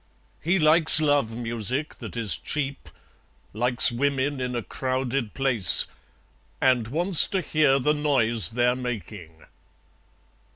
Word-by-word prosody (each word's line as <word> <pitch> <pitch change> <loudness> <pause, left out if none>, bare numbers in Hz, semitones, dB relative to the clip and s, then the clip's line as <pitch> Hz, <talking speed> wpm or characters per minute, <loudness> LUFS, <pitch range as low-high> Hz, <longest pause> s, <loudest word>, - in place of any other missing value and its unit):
He 175 +4 0
likes 155 -1 +5
love 145 -6 0
music 120 +5 -4
that - - -10
is 105 -8 -2
cheap; 140 -2 -6 0.6
Likes 120 +3 +1
women 140 +2 -2
in 125 -1 -4
a 120 - -4
crowded 130 -2 -4
place; 130 -9 +4 0.7
And 125 -4 +1
wants 170 +7 +3
to 195 - -2
hear 150 -4 +1
the 150 +3 0
noise 120 - +2
they're 125 +1 0
making. 105 -10 -9
130 Hz, 120 wpm, -23 LUFS, 115-145 Hz, 0.7 s, likes